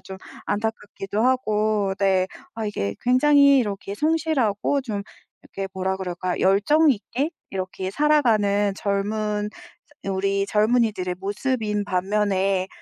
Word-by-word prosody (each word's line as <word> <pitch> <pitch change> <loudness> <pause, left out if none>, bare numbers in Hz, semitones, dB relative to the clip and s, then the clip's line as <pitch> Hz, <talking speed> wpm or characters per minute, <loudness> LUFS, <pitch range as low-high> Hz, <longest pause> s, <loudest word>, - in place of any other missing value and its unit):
좀 190 - -9 0.3
안타깝기도 210 -1 -3
하고 215 -5 +1
네. 190 -2 +2 0.3
아, 225 -1 -4
이게 100 - -3
굉장히 280 +2 +5
이렇게 200 -3 -3
성실하고 285 -4 +1
좀 210 -6 -4 0.4
이렇게 195 0 -6
뭐라 190 0 -1
그럴까, 180 -1 -3
열정 280 +12 +4
있게 265 +6 -2 0.2
이렇게 185 0 -4
살아가는 215 -8 +2
젊은 210 +1 -1 0.5
우리 195 +1 0
젊은이들의 210 -4 +1
모습인 210 0 -1
반면에 195 0 0
205 Hz, 265 characters per minute, -23 LUFS, 195-240 Hz, 0.5 s, 굉장히